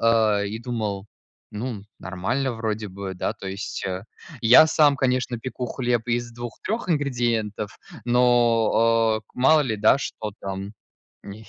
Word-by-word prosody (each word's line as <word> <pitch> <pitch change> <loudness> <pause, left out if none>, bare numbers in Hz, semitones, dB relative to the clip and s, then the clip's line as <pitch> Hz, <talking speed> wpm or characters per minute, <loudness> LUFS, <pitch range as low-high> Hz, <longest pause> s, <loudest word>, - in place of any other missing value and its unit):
а, 110 -3 +3
и 105 +2 -4
думал: 110 -5 -4 0.4
"Ну, 105 -1 -5
нормально 120 +9 -2
вроде 110 -2 -3
бы". 95 0 -6
Да, 95 - -2
то 100 -2 -10
есть, 100 +2 -5
э, 95 +1 -4 0.4
я 120 +7 +8
сам, 150 -3 +4
конечно, 125 -2 0
пеку 125 +1 -5
хлеб 120 -2 -1
из 120 0 -1
2-3 120 - -5
ингредиентов, 120 -8 -1 0.3
но, 120 +1 +2 0.5
о, 115 -1 +3
мало 150 +5 +5
ли, 110 -5 -2
да, 105 +5 +5
что 110 -5 -5
там 95 +1 -5 0.5
в - - -12
ней. 110 +2 -10
115 Hz, 145 wpm, -24 LUFS, 105-125 Hz, 0.5 s, я